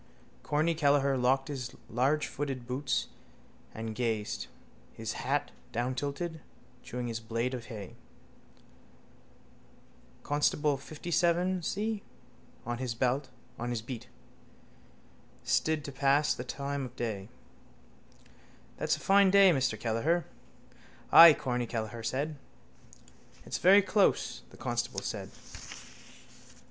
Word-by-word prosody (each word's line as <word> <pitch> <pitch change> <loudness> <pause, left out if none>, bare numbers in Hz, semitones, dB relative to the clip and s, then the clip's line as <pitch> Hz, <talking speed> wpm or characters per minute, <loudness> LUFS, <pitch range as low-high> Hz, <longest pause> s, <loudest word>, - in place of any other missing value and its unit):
Corny 155 +3 +1
Kelleher 140 -3 +3
locked 130 +1 +2
his 130 -4 -5
largefooted 135 0 -1
boots 130 +3 -1 0.6
and 110 0 -5
gazed, 110 -3 -2 0.5
his - - -4
hat - - -1 0.2
downtilted, 140 +7 -2 0.4
chewing 125 0 -5
his 115 -1 -3
blade 115 +3 -2
of 120 -2 -5
hay. 105 -6 -8 2.3
Constable 145 0 +1
57C, 175 +7 0 0.6
on 120 0 -3
his 130 -3 -2
beat, 120 -2 -3 1.4
stood 155 -3 +1
to 140 - -5
pass 140 +2 +3
the 125 - -6
time 140 +2 -3
of 125 - -10
day. 105 -5 -4 1.5
—That's - - 0
a - - -12
fine 195 0 +5
day, 195 -1 +7
Mr 130 -4 0
Kelleher. 140 +10 0 0.9
—Ay, 165 -2 +11
Corny 125 -2 -2
Kelleher 115 0 -4
said. 145 +6 -2 1.1
—It's - - -3
very 195 +3 +7
close, 200 0 +2
the - - -16
constable - - -2
said. - - -4
135 Hz, 100 wpm, -30 LUFS, 120-155 Hz, 2.3 s, Ay